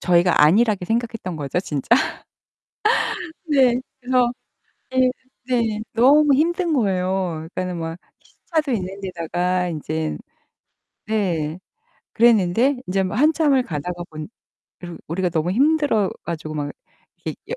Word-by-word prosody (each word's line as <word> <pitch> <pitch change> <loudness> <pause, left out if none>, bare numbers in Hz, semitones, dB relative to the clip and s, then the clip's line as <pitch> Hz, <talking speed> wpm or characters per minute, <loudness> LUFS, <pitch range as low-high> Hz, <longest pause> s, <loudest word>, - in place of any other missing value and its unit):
저희가 175 -1 +4
안일하게 200 +5 +4
생각했던 225 -4 -2
거죠, 150 +3 -2
진짜. 150 -7 -5 1.6
네. 260 -5 +3 0.2
그래서 250 -1 +2 0.6
네. 260 -1 +3 0.4
네. 230 -4 0
너무 280 +5 +5
힘든 340 +4 +1
거예요. 185 - 0
그러니까는 180 -1 -3
막 165 0 -4 0.2
시차도 310 -4 -3
있는 195 -3 -3
데다가 180 0 -1
인제 155 -1 -3 0.9
네. 175 -7 -1 0.6
그랬는데 230 +3 +4
이제 195 +1 +1
뭐 185 +2 -3
한참을 295 0 +3
가다가 175 0 -4
보니 155 0 -7 0.5
그리고 175 -2 -8
우리가 180 +3 0
너무 165 +1 0
힘들어 275 -3 +2
가지고 155 -2 -5
막 145 -1 -3 0.5
이렇게 - - -4
옆 - - -3
190 Hz, 270 characters per minute, -22 LUFS, 170-250 Hz, 1.6 s, 너무